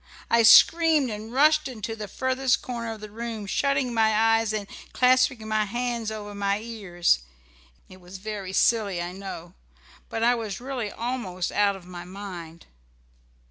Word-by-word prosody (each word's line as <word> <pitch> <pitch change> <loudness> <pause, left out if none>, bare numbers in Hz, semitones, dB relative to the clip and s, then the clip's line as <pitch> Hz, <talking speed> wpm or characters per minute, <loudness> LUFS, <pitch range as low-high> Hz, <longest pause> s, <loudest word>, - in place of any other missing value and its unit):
I 235 - +5
screamed 310 +3 +6
and 215 +1 -7
rushed 305 +3 +4
into 225 -3 -5
the 215 -2 -6
furthest 260 +2 0
corner 235 -2 -4
of 215 - -12
the 215 -1 -9
room, 225 -1 -5
shutting 275 +3 0
my 220 -1 +3 0.3
eyes 225 -1 -1
and 215 -2 -3 0.3
clasping 255 -2 +3
my 215 -1 +1
hands 240 +1 -3
over 210 -1 -7
my 200 0 -1
ears. 200 - 0 0.7
It 185 0 -15
was 180 +2 -10
very 200 -1 -6
silly 200 -2 +2
I 175 +1 -4
know, 185 -3 -8 0.6
but 225 - -3
I 240 +1 +5
was 220 -5 -4
really 250 -4 -4
almost 225 -7 -3
out 205 -1 +2
of 190 -2 -12
my 175 -1 -8
mind. 180 -3 -9
220 Hz, 160 wpm, -25 LUFS, 195-245 Hz, 0.7 s, screamed